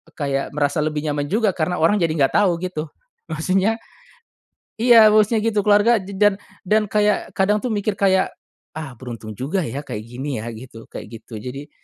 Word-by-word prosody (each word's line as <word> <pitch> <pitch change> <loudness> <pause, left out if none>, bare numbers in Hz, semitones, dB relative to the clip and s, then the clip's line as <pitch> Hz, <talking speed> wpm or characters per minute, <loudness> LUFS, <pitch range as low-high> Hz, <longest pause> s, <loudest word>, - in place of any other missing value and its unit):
kayak 140 -2 -2
merasa 145 0 +1
lebih 150 -1 -2
nyaman 145 -1 -1
juga 215 0 +2
karena 180 +2 -1
orang 170 +6 +3
jadi 165 -3 +1
nggak 140 -4 +2
tahu 195 -4 +4
gitu. 180 -4 -3 0.5
Maksudnya 190 +8 +1 1.0
iya, 230 -3 +8
bosnya 215 +1 +4
gitu 215 -1 +1
keluarga 210 +3 +5
je 195 +1 -9
dan 205 -1 +4 0.3
dan 210 +3 +3
kayak 210 0 +1
kadang 200 +2 +3
tuh 250 - -2
mikir 205 0 -1
kayak, 190 -1 +2 0.4
ah, 155 -5 -6
beruntung 115 -3 -8
juga 155 +10 -1
ya 140 +3 -4
kayak 105 - -5
gini 125 +1 -5
ya 115 - -5
gitu 115 0 -11
kayak - - -8
gitu. 110 - -9
Jadi 135 +5 -7
180 Hz, 180 wpm, -21 LUFS, 140-210 Hz, 1.0 s, iya